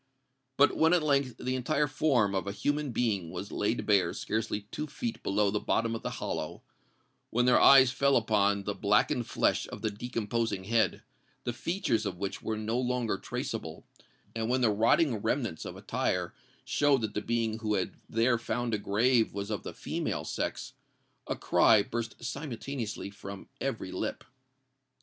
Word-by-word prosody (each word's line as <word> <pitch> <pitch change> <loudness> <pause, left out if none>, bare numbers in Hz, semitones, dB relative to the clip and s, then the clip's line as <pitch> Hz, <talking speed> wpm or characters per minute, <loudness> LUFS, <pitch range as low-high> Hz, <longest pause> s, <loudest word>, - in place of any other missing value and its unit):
But 145 - +5
when 160 +2 +4
at 175 -3 +3
length 140 -5 +1
the 130 - -2
entire 140 +4 +1
form 135 -8 +2
of 95 0 -1
a - - -1
human 145 +6 -1
being 105 -8 0
was 100 - -6
laid 110 +3 -1
bare 95 -5 +3
scarcely 110 0 -2
two 155 - -4
feet 230 - -4
below 100 0 +1
the 105 - 0
bottom 115 +2 0
of 115 - -4
the - - -3
hollow,—when 120 +2 -5
their 125 - +5
eyes 130 -2 +8
fell 140 +1 +2
upon 100 -3 +2
the 100 - -2
blackened 110 +5 +2
flesh - - +1
of 105 - -9
the 110 - 0
decomposing 115 -2 -2
head, 110 -2 +1 0.4
the 120 - -2
features 125 - -1
of 90 -3 -4
which 100 +1 -4
were 110 -1 -2
no 110 +3 -1
longer 125 -5 -1
traceable,—and 115 0 -6
when 130 +1 +2
the 115 -3 +4
rotting 115 +5 +3
remnants 110 - -2
of - - -7
attire - - -1 0.3
showed 145 -3 +3
that 110 -2 -3
the 105 - -2
being 115 0 -1
who 105 -2 0
had 95 - -1 0.2
there 115 +1 +2
found 120 0 -2
a 105 - +1
grave 110 +3 +2
was 100 +1 -4
of 105 - -2
the - - -6
female - - -3
sex, - - -3 0.5
a - - -1
cry 110 -3 +4
burst 115 -1 -4
simultaneously 130 -6 -4
from 100 -1 -9
every - - -3
lip. - - -3
115 Hz, 170 wpm, -30 LUFS, 105-130 Hz, 0.5 s, eyes